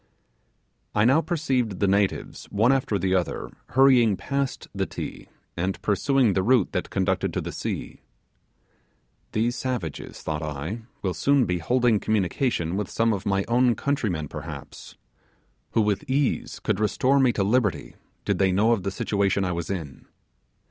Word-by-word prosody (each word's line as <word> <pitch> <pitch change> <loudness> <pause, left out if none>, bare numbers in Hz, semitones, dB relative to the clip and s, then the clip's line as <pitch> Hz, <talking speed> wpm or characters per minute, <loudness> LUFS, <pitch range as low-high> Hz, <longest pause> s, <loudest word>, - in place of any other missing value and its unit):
I 105 +1 +4
now 135 +6 +5
perceived 130 - -1
the 100 - +2
natives 100 0 0
one 115 +5 +2
after 130 -6 +1
the 95 0 0
other 90 -2 -1 0.2
hurrying 125 -5 +5
past 140 +6 -3
the - - -1
Ti - - -7 0.3
and 90 +3 -2
pursuing 125 +1 +2
the 95 - +1
route 115 0 +3
that - - -2
conducted 95 0 0
to - - +1
the - - -5
sea. - - -5 1.3
These 115 +3 +1
savages, 120 - -4
thought 75 -1 -3
I, 80 +9 -5 0.2
will 95 -2 0
soon 140 +7 +3
be 90 0 -1
holding 120 +1 +2
communication 95 -3 0
with 100 -1 -2
some 115 0 +1
of 100 0 -4
my 95 0 +1
own 120 0 +3
countrymen 105 - -1
perhaps, - - -9 0.8
who 115 - +3
with 105 +1 -1
ease 135 +1 0
could 95 - -1
restore 130 +6 +2
me 130 -2 +4
to 100 - 0
liberty 100 - 0 0.3
did - - 0
they 95 -1 +3
know 105 +5 +3
of 115 -4 +2
the 100 - -2
situation 100 0 0
I 90 - -1
was 85 -1 -4
in. 80 -9 -6
105 Hz, 160 wpm, -25 LUFS, 95-125 Hz, 1.3 s, now